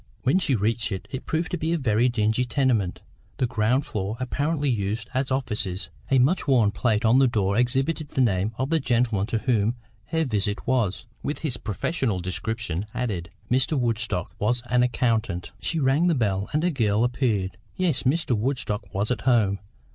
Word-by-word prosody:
When 135 +8 +3
she 140 -7 +2
reached 110 +2 0
it, 95 - -4
it 130 - -6
proved 165 +2 -1
to 180 - -2
be 160 +2 0
a - - +2
very 120 -3 +2
dingy 110 0 +1
tenement, 120 -7 0 0.3
the - - +2
ground 125 +3 +1
floor 105 0 -3
apparently 145 +4 -1
used 110 -1 -1
as 130 +1 0
offices; 105 -8 -2 0.2
a 135 - +4
much 145 +10 +2
worn 120 -7 +4
plate 110 -1 +1
on 115 +4 +5
the 135 - +5
door 100 -4 +1
exhibited 135 +6 +1
the 140 - -3
name 100 -3 +2
of 130 +4 -2
the 165 - +4
gentleman 120 -6 +1
to 115 - 0
whom 115 -1 +1 0.3
her 160 +5 0
visit 105 -4 -1
was, 115 -7 0 0.2
with 145 - -3
his 125 -6 -1
professional 105 - -1
description 95 +1 -3
added. 95 -9 -2 0.2
Mr. 130 +4 +2
Woodstock 115 -6 -1
was 120 +3 0
an 125 0 +4
accountant. 115 -7 0
She 165 - 0
rang 140 +5 +3
the 170 - +3
bell, 100 -5 0
and 150 +2 +1
a 180 - +2
girl 110 -6 +2
appeared. 105 -7 0 0.2
Yes, 170 -8 +1
Mr. 140 0 +1
Woodstock 105 -4 -2
was 105 +4 0
at 125 - -1
home. 105 -6 +3
120 Hz, 185 wpm, -25 LUFS, 105-135 Hz, 0.3 s, on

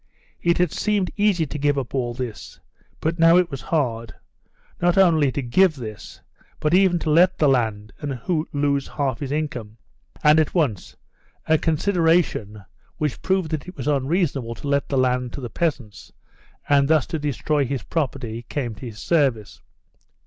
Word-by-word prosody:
It 170 0 +2
had 180 -3 +1
seemed 205 -3 0
easy 200 -5 +2
to 150 +1 -6
give 145 0 +1
up 130 -4 -4
all 120 -3 -2
this, 125 -4 -7 0.4
but 165 +2 -1
now 165 +1 +6
it 180 -2 +2
was 135 - -5
hard, 115 -8 -2 0.7
not 175 +1 +2
only 160 -7 +4
to 140 - -3
give 160 +8 +3
this, 110 -6 -9 0.4
but 155 +2 0
even 185 -1 +4
to 160 -2 -2
let 180 +4 +4
the 150 - +3
land 110 -5 0
and 140 -4 -4 0.3
lose 140 -1 0
half 135 -5 -2
his 140 -2 -4
income. 125 -8 -4 0.5
And 150 +1 +6
at 155 - 0
once 135 - -1 0.5
a 160 -1 +3
consideration, 160 - +1 0.3
which 150 -4 -2
proved 185 -4 0
that 155 +1 -3
it 180 - -10
was 130 - -5
unreasonable 140 -4 0
to 145 - -8
let 140 0 0
the 140 - 0
land 125 -1 +1
to 140 - -6
the 120 -3 -6
peasants, 125 - -3 0.6
and 140 -1 +4
thus 155 -2 +3
to 160 - -4
destroy 145 0 0
his 135 -2 -3
property, 125 -7 -3
came 125 -6 -3
to 110 +4 -9
his 110 -2 -9
service. 135 - 0
145 Hz, 170 wpm, -22 LUFS, 125-165 Hz, 0.7 s, now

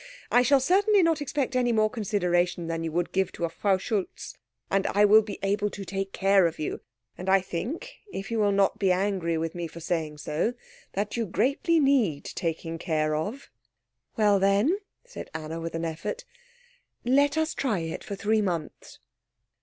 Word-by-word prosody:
I 245 - +6
shall 270 +2 +4
certainly 390 +7 +4
not 325 -2 +2
expect 280 -2 -2
any 245 -1 +2
more 215 -1 +3
consideration 180 -6 0
than 165 0 -3
you 165 - -3
would 175 +2 -1
give 190 -1 0
to 170 - -2
a - - -3
Frau 195 +3 +1
Schultz. 195 0 -4 0.4
And 195 0 +2
I 205 +1 +4
will 215 +2 +7
be 210 -1 -7
able 205 +1 +1
to 200 -1 -7
take 195 0 -3
care 195 -2 +4
of 165 - -5
you; 155 - -4 0.4
and 185 +1 -3
I 195 0 +6
think, 235 - -5
if 195 +3 -6
you 230 - 0
will 205 -1 +3
not 195 0 +2
be 195 -2 +3
angry 180 -3 0
with 160 0 -2
me 175 -1 -4
for 165 - -11
saying 160 -2 -2
so, 155 +11 -1 0.4
that 205 +3 -2
you 230 -2 -1
greatly 275 - +1
need 255 - +2
taking 165 0 -4
care 155 -3 0
of." 210 - -4 0.7
"Well, 205 -2 +4
then," 200 - +3 0.3
said - - -9
Anna, 160 +1 -5
with 165 0 -5
an 165 0 -2
effort, 170 - -4 0.8
"let 285 +4 +3
us 315 0 +1
try 220 -10 -1
it 165 0 -5
for 200 - -5
three 215 +2 +1
months." 170 -6 -4
195 Hz, 185 wpm, -27 LUFS, 170-235 Hz, 0.8 s, will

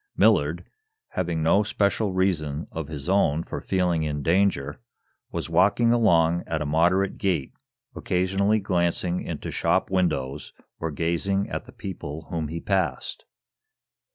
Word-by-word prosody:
Millard, - - +3 0.4
having 85 -3 -2
no 85 +6 +4
especial 105 0 0
reason 85 -5 0
of 80 -3 -5
his 75 -1 -7
own 85 -5 +2
for - - -6
feeling 90 -4 +1
in 75 -2 -2
danger, 80 -5 +1 0.5
was - - -3
walking 100 +8 +3
along 85 -7 +3
at 80 -1 -1
a 75 - -2
moderate 90 +6 +2
gait, 90 -9 -1 0.4
occasionally 95 +4 +1
glancing 90 -2 0
into - - -5
shop - - +1
windows 75 -7 -1 0.3
or 80 - -2
gazing 85 +6 0
at - - -4
the - - -13
people 80 -5 -7
whom 80 -3 -2
he 80 +3 -5
passed. 95 +1 -2
85 Hz, 135 wpm, -25 LUFS, 80-95 Hz, 0.5 s, no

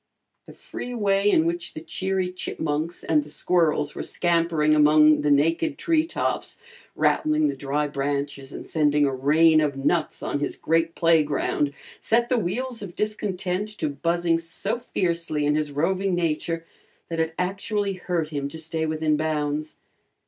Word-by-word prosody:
The - - -11
free 245 0 -7
way 200 -2 +2
in 160 -5 +4
which 170 0 -3
the - - -4
cheery 185 +3 -2
chipmunks 160 -2 -3
and 155 -2 +2
the 150 - -12
squirrels 155 -2 +1
were - - -5
scampering 165 -3 +1
among 150 0 +5
the 150 - +1
naked 165 - +2
tree 325 -2 +1
tops, - - -2 0.4
rattling 310 0 +2
the - - -3
dry 145 +2 -1
branches 140 -1 -3
and - - -8
sending 150 -2 +2
a 135 - 0
rain 155 +4 +4
of 145 -2 0
nuts 155 +4 0
on 145 - -2
his 145 - -2
great 165 0 0
playground, 150 -3 +2 0.3
set 235 +1 +1
the 250 - +2
wheels 235 +6 -3
of 190 -4 -8
discontent 200 -2 -2
to 155 - -1
buzzing 170 +3 0
so 195 +7 -3
fiercely 170 -9 -1
in 145 - +2
his 150 -1 -1
roving 185 +6 0
nature 165 0 -1 0.4
that 165 -1 -3
it 160 0 -1
actually 195 +2 -1
hurt 175 -4 -2
him 140 -2 -3
to 140 - -7
stay 160 0 -2
within 155 -1 +1
bounds. 150 -1 -2
165 Hz, 160 wpm, -24 LUFS, 150-185 Hz, 0.4 s, among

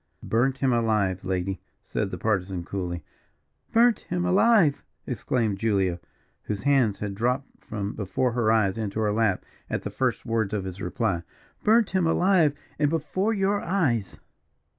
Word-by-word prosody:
"Burnt 130 +4 +1
him 130 -2 +2
alive, 105 -5 +1
lady," 95 0 -2 0.2
said - - -2
the - - -5
Partisan, 95 -4 -1
coolly. 90 -3 -4 0.7
"Burnt 235 0 +4
him 175 0 0
alive!" 185 -4 +4 0.2
exclaimed 110 -6 -1
Julia, 95 -5 +1 0.5
whose 105 -2 -3
hands 135 -8 +3
had 105 -1 -4
dropped 125 +6 -2
from 100 -1 -4
before 110 +5 -1
her 115 -2 +2
eyes 110 -2 +2
into 105 -1 -3
her 105 -1 +1
lap 110 -3 +1 0.2
at - - -2
the - - -4
first - - -1
words 110 -2 0
of 100 - -2
his 95 +1 -6
reply. 100 -5 -1 0.4
"Burnt 220 0 +4
him 185 -3 +2
alive, 170 -3 +3 0.2
and 145 -1 +3
before 165 +7 0
your 200 -1 +1
eyes!" 145 - 0
115 Hz, 155 wpm, -26 LUFS, 100-155 Hz, 0.7 s, Burnt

